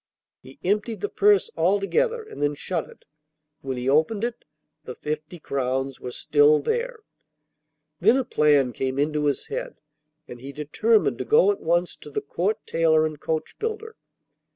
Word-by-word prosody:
He 130 - -15
emptied 210 +2 -1
the 205 - -2
purse 205 -1 +3
altogether 205 - +1
and 435 - -10
then 145 0 +1
shut 170 +2 -3
it; - - -18 0.6
when 135 -1 -4
he 125 +1 -3
opened 160 +10 +2
it 240 0 -4 0.4
the 125 -4 -8
fifty 155 +3 -5
crowns 135 -2 -2
were 125 - -6
still 150 +3 +4
there! 475 - -2 1.0
Then 220 +8 +5
a 265 - 0
plan 145 - +3
came 130 0 -2
into 150 +1 0
his 145 -1 0
head, - - -5 0.5
and 120 -1 -10
he 140 +2 -8
determined 210 +10 +1
to - - -3
go 450 -2 +5
at 405 - -5
once 175 +2 0
to - - -12
the 145 - -2
Court 180 +9 -1
tailor 160 -1 +3
and 155 -2 -4
coachbuilder. 440 - -4
160 Hz, 160 wpm, -24 LUFS, 145-225 Hz, 1.0 s, Then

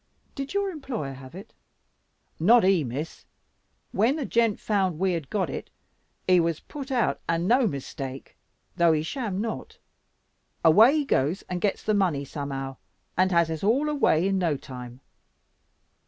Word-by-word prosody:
Did 275 +6 -6
your 400 -1 +1
employer 255 - -5
have 130 +2 -12
it?" 195 - -11 0.9
"Not 230 +8 +6
he, 185 -4 +4
Miss. 140 +6 -5 0.7
When 230 +8 +2
the 300 -4 -3
gent 230 -3 +1
found 190 -6 0
we 190 +2 +1
had 160 -5 -4
got 195 -4 0
it, 135 - -6 0.6
he 185 -1 +6
was 165 -2 0
put 280 -2 -8
out 250 -3 +1
and 165 +1 +1
no 245 +1 +4
mistake; 135 -3 -6 0.4
though 170 -2 +4
he 155 -1 0
sham 205 - -3
not. 220 +1 -5 0.9
Away 220 - +7
he 295 - 0
goes 155 - 0
and 180 -1 -5
gets 205 - 0
the 215 - +1
money 175 -9 +1
somehow, 135 -2 -5 0.4
and 185 +1 +3
has 170 -2 +3
us 160 +1 -4
all 265 +9 +2
away 195 - +2
in 195 -1 +1
no 165 -5 +1
time." 125 -2 -10
185 Hz, 160 wpm, -26 LUFS, 150-230 Hz, 0.9 s, Away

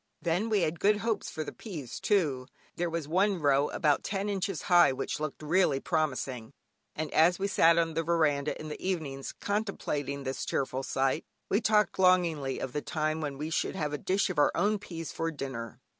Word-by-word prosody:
Then 180 +6 0
we 210 -3 +2
had 160 0 -1
good 210 +1 +4
hopes 220 -1 -2
for 155 - -4
the - - -6
peas 155 - -7
too; 145 -11 +1 0.3
there 175 0 -1
was 165 -3 -3
one 190 +3 +2
row 140 -1 +3
about 150 -5 +1
ten 200 0 -2
inches 195 -3 -2
high 175 -5 +6
which 130 - -3
looked 155 0 -5
really 155 -3 +2
promising, 135 -7 -2 0.4
and 155 0 -4
as 175 +3 +5
we 195 - -2
sat 170 -4 +5
on 165 -1 +1
the 165 - 0
veranda 155 -3 +1
in 155 - -6
the 150 - -7
evenings 155 -8 -3
contemplating 150 -9 -2
this 130 0 -3
cheerful 130 -1 -1
sight, 135 +3 0 0.3
we 200 - +2
talked 210 -3 +2
longingly 170 -7 +3
of 130 - -5
the 150 - -1
time 155 0 -1
when 145 -3 -4
we 155 +3 -4
should - - -1
have 150 -5 -2
a 150 - -2
dish 190 +1 +1
of 165 - -2
our 145 - +5
own 210 +1 +2
peas 165 -4 -7
for 165 0 -2
dinner. 130 -7 -6
160 Hz, 200 wpm, -29 LUFS, 145-185 Hz, 0.4 s, high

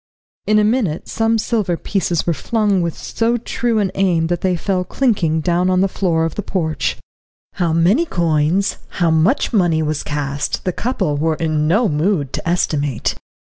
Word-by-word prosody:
In 215 - +4
a 210 - +4
minute 210 -8 0
some 225 0 +1
silver 210 -5 0
pieces 180 -4 -1
were 170 - +1
flung 205 - 0
with 170 -2 -2
so 230 +1 -1
true 235 0 -1
an 200 -3 +1
aim 180 -4 +1
that 175 - -4
they 185 -1 +1
fell 185 +1 -1
clinking 180 - 0
down 175 +3 +1
on 185 0 +2
the 195 - +3
floor 170 -4 0
of 165 - -3
the - - -3
porch. 165 -5 -2 0.6
How 175 -4 0
many 185 - +3
coins, 170 - +1 0.2
how 170 -3 +1
much 165 - +2
money 175 -6 +2
was 155 -1 -1
cast, 145 -1 -3
the 185 - 0
couple 195 - -1
were 160 +2 +1
in 155 -1 0
no 210 +8 +3
mood 150 -3 0
to - - -3
estimate. 145 -7 0
175 Hz, 175 wpm, -18 LUFS, 160-205 Hz, 0.6 s, In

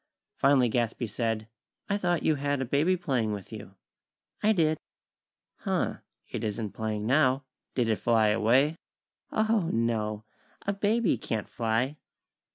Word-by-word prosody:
Finally 135 -2 +4
Gadsby 120 +1 0
said: 110 0 -2 0.4
"I 200 - +1
thought 175 -4 0
you 160 - +4
had 145 -1 -1
a 135 - -1
baby 150 +9 +2
playing 125 -11 0
with 100 +1 -7
you." 105 -2 -9 0.7
"I 215 - +4
did." 155 -6 +2 0.8
"Huh, - - -1 0.3
it - - -5
isn't 105 -1 -2
playing 110 -1 -3
now. 130 +1 +3 0.3
Did 125 -3 +2
it 110 -2 +2
fly 110 +1 +3
away?" 125 +9 +3 0.5
"Oho! 220 +1 +2
No! 110 -3 0 0.4
A 200 - +1
baby 205 - +1
can't 110 -3 -3
fly!" 120 +5 -1
125 Hz, 140 wpm, -28 LUFS, 110-155 Hz, 0.8 s, Finally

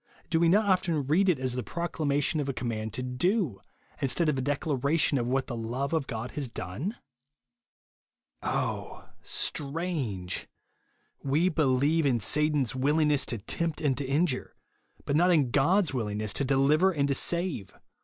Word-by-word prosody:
Do 165 - +3
we 170 0 +4
not 210 +5 +4
often 175 -7 +1
read 180 +8 +3
it 175 - +3
as 130 -1 -1
the 125 - -2
proclamation 150 - -1
of 140 -2 -2
a - - -1
command 110 -3 -3
to 125 - -3
do, 135 - 0 0.4
in 135 - +2
stead 165 +4 +1
of 145 - 0
a - - -1
declaration 145 +1 +1
of 120 - -2
what 130 +1 0
the 120 - -5
love 120 +6 -3
of 155 -4 0
God 115 -3 -5
has 140 -4 -3
done? 115 - -5 1.4
Oh, - - -3
strange! 140 - -2 0.7
We 150 +7 +2
believe 150 0 +2
in 125 -3 +2
Satan's 150 +2 +1
will 140 +4 +1
ingness 150 -3 +2
to 120 - 0
tempt 160 +10 -1
and 145 -4 +1
to - - -1
injure; 140 +1 -1 0.5
but 140 - 0
not 175 +4 +4
in 150 -8 +3
God's 165 +5 +3
willingness 105 -4 -2
to 140 - +1
deliver 140 +7 +3
and 145 -5 0
to 140 - +1
save 170 - 0
140 Hz, 165 wpm, -28 LUFS, 130-165 Hz, 1.4 s, we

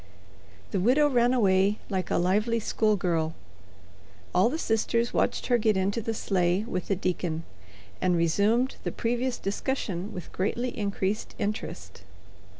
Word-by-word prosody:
The 195 - 0
widow 260 +10 +4
ran 245 -3 +3
away 200 -4 +3
like 190 -3 -2
a - - +1
lively 210 +6 +2
schoolgirl. 180 -8 0 1.0
All 185 +6 +4
the 315 - -2
sisters 230 -2 0
watched - - +1
her 245 -1 +3
get 215 -2 +2
into 200 +4 0
the 225 +1 -3
sleigh 185 -1 +1
with 185 -6 -4
the 195 - +1
deacon, 175 -3 -2 0.6
and 185 -1 +2
resumed 205 +10 +2
the - - -2
previous 240 +2 -1
discussion 200 -3 -3
with 180 -5 -8
greatly 240 +6 -2
increased 200 0 -2
interest. 210 +2 -4
205 Hz, 140 wpm, -27 LUFS, 185-235 Hz, 1.0 s, widow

